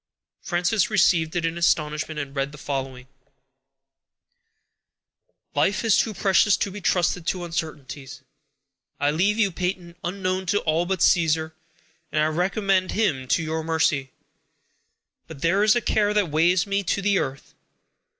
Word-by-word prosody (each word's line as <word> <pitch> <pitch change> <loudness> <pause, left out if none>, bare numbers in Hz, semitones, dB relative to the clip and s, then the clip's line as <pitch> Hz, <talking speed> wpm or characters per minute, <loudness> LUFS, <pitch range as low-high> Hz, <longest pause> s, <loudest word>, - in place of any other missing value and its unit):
Frances 180 +6 0
received 170 -6 +2
it 170 -1 0
in 165 +1 -2
astonishment, 155 -2 0
and 140 -1 -6
read 135 0 -1
the 150 - -12
following: 135 -3 -5 2.5
_"Life 205 +4 +1
is 225 -2 +4
too 220 -3 +1
precious 200 +2 +3
to 200 - -2
be 205 +2 -8
trusted 180 -2 0
to 180 -2 -1
uncertainties. 150 -5 -6 0.8
I 145 +1 +2
leave 195 +7 +1
you, 205 -4 +2
Peyton, 180 -1 -4
unknown 185 +1 -2
to 205 - +1
all 165 +2 0
but 190 -2 0
Caesar, 160 -2 +2 0.6
and 155 - 0
I 155 - +3
recommend 185 +3 0
him 150 -13 0
to 165 - +1
your 160 0 -3
mercy. 160 -4 0 1.2
But 160 -4 -10
there 190 +5 +3
is 215 +1 +5
a 240 - +1
care 210 -1 +1
that 200 -7 +1
weighs 170 +3 +3
me 200 0 0
to 195 - -1
the 200 -1 +2
earth. 135 0 -5
175 Hz, 150 wpm, -24 LUFS, 155-195 Hz, 2.5 s, is